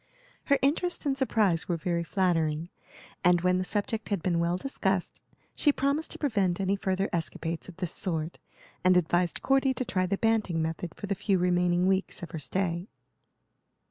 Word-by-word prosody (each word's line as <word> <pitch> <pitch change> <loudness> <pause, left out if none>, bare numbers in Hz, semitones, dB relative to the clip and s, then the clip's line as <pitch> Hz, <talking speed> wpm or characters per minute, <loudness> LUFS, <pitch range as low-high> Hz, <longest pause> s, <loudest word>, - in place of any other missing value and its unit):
Her 280 - +4
interest 325 +5 +1
and 275 -2 +1
surprise 215 -10 +1
were 175 - 0
very 170 +1 -1
flattering, 165 -3 0 0.5
and 175 0 +5
when 180 +1 +2
the - - 0
subject 210 +3 -2
had 200 -5 -1
been 175 -2 +1
well 170 +1 +1
discussed 190 -6 -2 0.3
she 295 - +3
promised 280 +3 0
to - - -6
prevent 200 - +1
any 195 0 +1
further 195 0 0
escapades 165 0 -3
of 175 - -12
this 180 -3 -3
sort, 165 -3 -3 0.4
and 185 0 +5
advised 175 0 +1
Cordy 270 -1 +3
to 255 - -2
try 185 -4 0
the 195 +2 0
Banting 220 -7 +1
method 160 +1 -3
for - - -6
the 200 - -1
few 200 0 +1
remaining 180 0 +2
weeks 190 -1 0
of 175 - -7
her 160 - -4
stay. 170 +5 -1
185 Hz, 175 wpm, -28 LUFS, 170-205 Hz, 0.5 s, and